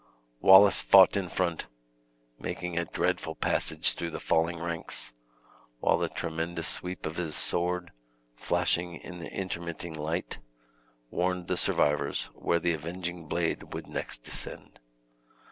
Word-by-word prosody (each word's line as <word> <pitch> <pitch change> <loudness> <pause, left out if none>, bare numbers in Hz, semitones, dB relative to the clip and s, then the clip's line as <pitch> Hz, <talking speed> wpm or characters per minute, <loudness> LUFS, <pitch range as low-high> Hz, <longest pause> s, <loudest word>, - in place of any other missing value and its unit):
Wallace 95 +1 +7
fought 95 0 +7
in 95 -3 -1
front, 85 -3 -2 0.7
making 90 -1 -4
a 85 0 0
dreadful 80 0 -1
passage - - +2
through 85 - -4
the 80 - -6
falling 80 +1 +1
ranks, 85 -6 -4 0.7
while - - +2
the - - -1
tremendous 80 0 -3
sweep 90 0 -2
of 80 +1 -4
his 80 -4 -2
sword, 90 0 +1 0.4
flashing 85 +7 0
in 90 0 -9
the 85 - -8
intermitting 85 -3 -5
light, 80 +3 -4 0.7
warned 90 0 -1
the - - -1
survivors 75 0 +1
where 85 - 0
the 85 0 +1
avenging 85 +1 -5
blade 85 +1 -2
would - - -6
next - - -4
descend. - - -3
85 Hz, 130 wpm, -29 LUFS, 80-90 Hz, 0.7 s, Wallace